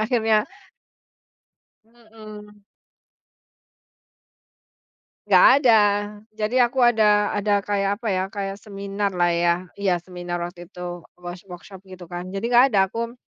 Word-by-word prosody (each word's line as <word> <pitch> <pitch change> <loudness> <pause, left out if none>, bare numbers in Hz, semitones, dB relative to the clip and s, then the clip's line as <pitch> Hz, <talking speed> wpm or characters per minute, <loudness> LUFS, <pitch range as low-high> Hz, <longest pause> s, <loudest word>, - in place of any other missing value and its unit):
akhirnya. 220 -1 +1 1.4
Mhm. 215 -3 -15 2.6
Enggak - - +6 0.2
ada. 235 - +7 0.6
Jadi 220 +4 +1
aku 245 +2 0
ada 210 -3 +3
ada 205 0 +1
kayak 200 0 -1
apa 230 -1 -7
ya, 185 0 0
kayak 200 -1 -6
seminar 200 -1 -4
lah, 175 -1 +2
ya, 170 0 +2 0.2
iya, 195 -3 0
seminar 175 0 -6
waktu 175 0 -8
itu. 175 -2 -7 0.2
Wors 175 0 -9
workshop, 185 +2 -11
gitu 185 -2 -12
kan. 175 +1 -7
Jadi, 195 +4 -4
enggak 245 +3 +5
ada. 200 -4 +1
Aku 230 +4 -6
200 Hz, 120 wpm, -22 LUFS, 180-220 Hz, 2.6 s, ada